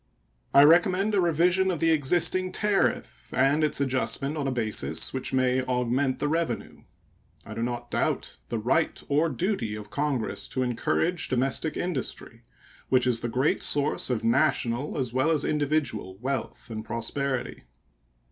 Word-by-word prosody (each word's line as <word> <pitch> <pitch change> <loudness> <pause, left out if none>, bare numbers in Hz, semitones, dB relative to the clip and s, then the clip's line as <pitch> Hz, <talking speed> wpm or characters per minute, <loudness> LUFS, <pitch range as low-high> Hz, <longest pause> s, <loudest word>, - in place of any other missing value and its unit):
I 140 - +7
recommend 180 +6 +4
a 200 - +3
revision 175 +3 +2
of 180 - -1
the 165 0 +3
existing 175 +5 +2
tariff 195 - -1
and 140 +4 +2
its 150 - +1
adjustment 140 +2 0
on 145 -3 -2
a - - 0
basis 115 -4 0
which 130 -1 -3
may 130 0 +2
augment 130 +1 0
the 145 - -1
revenue. 165 +2 -3 0.6
I - - -8
do - - -5
not 120 0 -4
doubt - - -1
the 115 - -2
right 130 +9 0
or 150 +3 +2
duty 180 - -2
of 105 0 -9
Congress 135 -2 -2
to 130 - -2
encourage 145 +8 0
domestic 135 +5 -1
industry, 175 -7 -4 0.5
which 130 -1 +3
is 125 -2 +2
the 120 - -3
great 130 +5 +1
source 145 -1 +1
of 120 -3 -1
national 130 +1 +1
as 125 -4 -2
well 130 +5 +2
as 160 -3 +1
individual 145 -10 -1
wealth 130 0 -4
and 110 -1 -5
prosperity. 130 +3 -3
135 Hz, 155 wpm, -26 LUFS, 125-160 Hz, 0.6 s, I